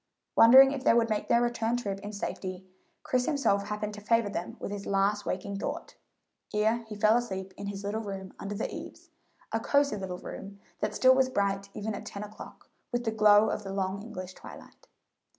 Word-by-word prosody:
Wondering 265 +4 +9
if 275 -2 -4
they - - +5
would 230 -1 +2
make 210 - -1
their 235 0 +4
return 235 0 0
trip 200 -5 -3
in 205 +1 -7
safety, 190 -2 -5 0.4
Chris 250 -1 0
himself 240 -10 +1
happened 210 0 -3
to 210 - -9
favor 230 0 +2
them 175 -3 -5
with - - -5
his 205 -1 -5
last 200 +1 +1
waking 195 +2 -3
thought, - - -5 0.6
ere 220 +2 +2
he 215 - -7
fell 215 +2 +4
asleep 190 -5 -4
in 200 - -6
his 200 0 -5
little 210 +2 -2
room 195 -3 -7
under 205 +1 -5
the - - -3
eaves - - -9 0.4
a - - 0
cosey 280 -6 +2
little 190 -2 -5
room 200 +2 -9 0.2
that 210 - -2
still 260 0 +6
was 260 0 +3
bright 200 -4 -1
even 215 +1 -3
at 200 - -7
ten 200 - -6
o'clock 210 +1 -11 0.2
with 240 -1 -1
the 225 - 0
glow 215 -1 +5
of - - -3
the 195 - -6
long 195 0 -2
English 190 -4 -7
twilight. - - -13
210 Hz, 205 wpm, -29 LUFS, 200-230 Hz, 0.6 s, Wondering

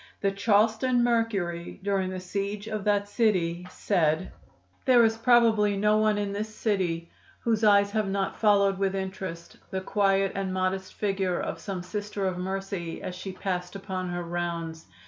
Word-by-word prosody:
The 195 - +2
Charleston 220 +5 +2
Mercury, 200 -9 -1
during 195 -2 0
the 185 0 -4
siege 200 +3 -3
of 215 -2 -3
that 205 -1 +2
city, 180 -6 +1
said: 170 -3 0 0.5
"There 245 -4 +6
is 225 0 +2
probably 225 -3 +4
no 210 +1 +3
one 215 -1 +3
in 205 -1 -2
this 210 +2 -3
city 175 -7 -1 0.3
whose 225 -1 +1
eyes 200 -1 +5
have 215 -1 0
not 195 0 -1
followed 200 -2 +4
with 195 -1 +1
interest 190 -3 -5
the 190 - -3
quiet 195 0 +2
and 195 -1 -2
modest 185 0 -2
figure 195 -3 0
of 165 - -4
some 180 +1 -5
Sister 205 +1 -4
of 185 -1 -1
Mercy 190 -2 -4
as 180 - -4
she 185 +2 -6
passed 180 -1 -4
upon 185 -2 -4
her 175 0 -3
rounds. 170 -1 -4
195 Hz, 165 wpm, -27 LUFS, 185-210 Hz, 0.5 s, There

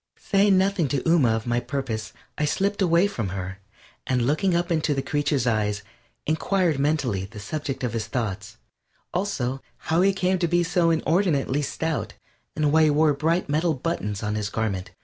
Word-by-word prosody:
Saying 195 -1 +3
nothing 190 -4 +2
to 135 0 -1
Ooma 150 -9 +4
of 110 - -4
my 120 0 +1
purpose, 120 -4 -4 0.2
I - - -2
slipped 200 +7 0
away 175 0 +4
from 115 - -2
her, 95 +1 -5 0.5
and 125 -2 +1
looking 155 +7 +1
up 175 +1 0
into 155 -3 +1
the 135 - -1
creature's 145 -3 0
eyes 105 -3 0 0.4
inquired 160 0 +1
mentally 140 -10 0
the 105 +2 -11
subject 135 +4 -4
of 125 - -1
his 115 -2 -2
thoughts; 105 -5 -4 0.6
also, 135 -9 -2 0.2
how 165 +2 0
he 195 +1 +5
came 185 -1 0
to 175 - +1
be 175 +1 +2
so 170 0 +2
inordinately 160 -4 +1
stout, 145 -6 -3 0.4
and 150 -1 +1
why 160 +1 +5
he - - +4
wore 150 +1 +4
bright 160 +5 0
metal 155 +2 +1
buttons 120 -9 -3
on 105 0 -1
his 105 -1 -2
garment. 105 -4 -2
145 Hz, 180 wpm, -24 LUFS, 115-170 Hz, 0.6 s, he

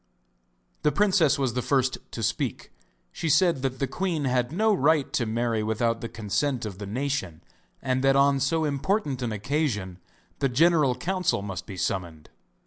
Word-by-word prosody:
The 150 - +2
princess 185 -3 +3
was 135 -4 0
the 125 - -1
first 130 0 +1
to 115 - -6
speak. 115 - -2 0.4
She 165 - -3
said 170 -2 +3
that 130 -1 -2
the 135 - 0
queen 165 +2 -2
had 125 -1 0
no 215 +6 +2
right 155 -4 +2
to 120 - 0
marry 115 0 0
without 115 +2 0
the 115 - -5
consent 115 +4 -2
of 100 -3 -7
the 100 - -6
nation, 105 - -3 0.4
and 130 0 0
that 135 0 +4
on 140 0 +4
so 160 +4 +1
important 145 - -1
an 120 -2 -2
occasion 105 - -2 0.4
the 135 - +1
general 150 -1 +3
council 180 - -1
must 95 -3 -6
be 95 - -8
summoned. 85 -5 -3
130 Hz, 170 wpm, -26 LUFS, 115-150 Hz, 0.4 s, that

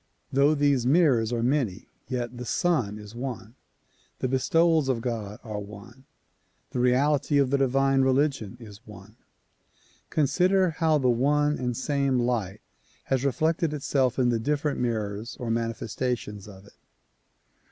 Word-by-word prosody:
Though 140 +3 +4
these 140 -4 +2
mirrors 130 -7 +3
are 115 -1 -1
many, 120 -7 -1 0.2
yet 125 -2 -3
the - - -4
Sun 125 -7 0
is 105 0 -11
one. 120 -2 -6 0.6
The - - -2
bestowals 160 +3 +2
of 125 -3 +1
God 110 -4 -4
are 105 -3 -5
one; 105 +6 -12 0.7
the - - -3
reality 140 +4 +2
of 135 -2 +2
the 140 - +3
divine 135 0 +2
religion 130 -4 0
is 105 -3 -12
one. 105 +1 -13 0.9
Consider 180 +5 +2
how 160 -1 +2
the 135 -3 +1
one 145 +5 +2
and 125 -2 -2
same 140 -1 0
light 115 -5 -1 0.4
has 135 -1 -1
reflected 155 +3 0
itself 135 -3 0
in 125 -2 +2
the 115 -1 +1
different 145 +3 -1
mirrors 110 -2 -3
or 120 -2 -3
manifestations 115 -2 -3
of 95 -1 -13
it. 105 - -20
125 Hz, 140 wpm, -26 LUFS, 115-145 Hz, 0.9 s, Though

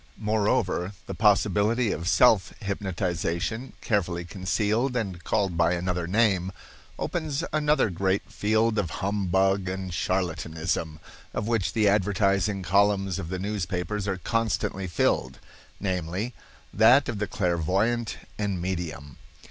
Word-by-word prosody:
Moreover, 105 -3 0
the 95 - -5
possibility 105 +3 +3
of 85 - -3
self 105 -2 +4
hypnotization, 95 +3 -2
carefully 90 -5 -1
concealed 105 +8 0
and 95 -7 -3
called 100 -5 0
by 85 +1 +3
another 90 -1 -2
name, 95 -2 +2 0.5
opens 160 -4 -2
another 150 -7 +2
great 95 +2 0
field 110 +1 +1
of 90 -6 -1 0.2
humbug 95 -1 +1
and 95 0 -4
charlatanism, 80 -3 -2 0.4
of 105 - -2
which 105 -8 0
the 110 -2 +3
advertising 100 0 +2
columns 95 0 +2
of 85 -3 -5
the 95 - -2
newspapers 100 0 -3
are 95 -1 -1
constantly 95 -1 -1
filled—namely, 90 - -2 0.4
that 120 +7 +6
of 105 - -3
the 105 - -1
clairvoyant 95 +7 0 0.2
and 100 -3 -1
medium. 85 -6 -4
95 Hz, 115 wpm, -26 LUFS, 90-105 Hz, 0.5 s, that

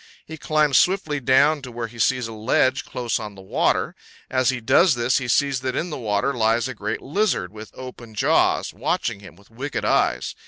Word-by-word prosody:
He 160 - -8
climbs 150 -2 +2
swiftly 175 -6 +1
down 135 +4 +3
to 130 -2 -9
where 120 0 -4
he 115 +1 -11
sees 125 +2 +2
a 115 - -8
ledge 130 +4 +1
close 120 -2 -2
on 105 -2 -7
the 95 - -12
water; 95 - 0 0.4
as 130 -2 +2
he 130 -1 -1
does 135 +7 +4
this, 120 +1 +1
he 130 - -5
sees 140 +1 +2
that 130 0 -3
in 175 +1 -2
the - - -4
water 105 +4 0
lies 115 0 +1
a 130 - -5
great 105 -1 -4
lizard, 150 - -1
with 110 0 -10
open 120 -3 -10
jaws, - - +2
watching - - -2
him 100 -5 -13
with 100 +4 -22
wicked 135 +5 -4
eyes. 60 - +1
125 Hz, 205 wpm, -22 LUFS, 110-140 Hz, 0.4 s, does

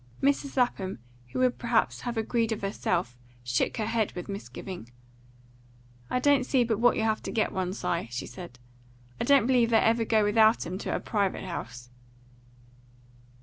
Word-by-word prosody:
Mrs. 280 0 0
Lapham, 205 -7 0 0.3
who 125 - -7
would 255 -1 +2
perhaps 235 -2 +1
have 240 -2 -4
agreed 225 +1 0
of 215 - -3
herself, 180 -8 -1 0.3
shook 125 0 0
her 220 - -1
head 225 -1 0
with 180 - -6
misgiving. 190 - -7 1.2
"I - - 0
don't 280 +1 +3
see 255 -1 +2
but 225 -3 -1
what 245 +1 +4
you'll 220 - +1
have 220 -1 0
to - - -5
get 220 - 0
you - - -11
one, 185 -1 -1
Si," 170 - -2
she 120 +1 -4
said. 175 -9 -10 0.6
"I - - -1
don't 280 -5 +5
believe 245 -2 +3
they 225 - +5
ever 230 +1 +3
go 220 -1 +2
without 220 +2 +4
'em 180 +3 -5
to - - -2
a - - -1
private 200 -4 -1
house." 125 -9 -7
220 Hz, 180 wpm, -28 LUFS, 185-240 Hz, 1.2 s, don't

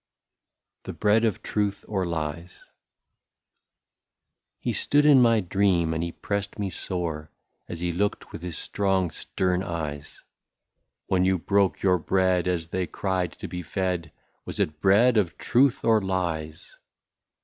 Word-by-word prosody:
94 - - -3
THE - - -19
BREAD 105 +2 +3
OF 110 -5 -1
TRUTH 100 -1 -2
OR 95 -4 -1
LIES. 85 +1 -5 1.9
He 120 - -2
stood 145 +8 +2
in 140 -3 +7
my 115 -2 +4
dream, 90 -3 +1
and 80 - -2
he 85 - -3
pressed 100 +3 -4
me 100 -3 -2
sore, 80 -4 -4 0.4
As 85 -1 -6
he 90 0 0
looked 100 +4 -2
with - - -8
his 90 -2 -5
strong 95 -3 0
stern 90 -1 -1
eyes: 75 -5 -5 0.3
— - - -60
" - - -54
When 90 -1 +3
you 95 0 +3
broke 100 +2 +1
your 90 -2 +3
bread, 95 +1 +1
as 85 -3 -1
they 90 -1 -2
cried 95 -4 -2
to - - -8
be 90 - -5
fed, 90 -2 -2 0.3
Was - - -7
it 75 -1 -1
bread 110 +5 +5
of 90 -5 +1
truth 130 +1 +2
or 110 -2 +4
lies 85 -5 -3
95 Hz, 155 wpm, -26 LUFS, 85-100 Hz, 1.9 s, in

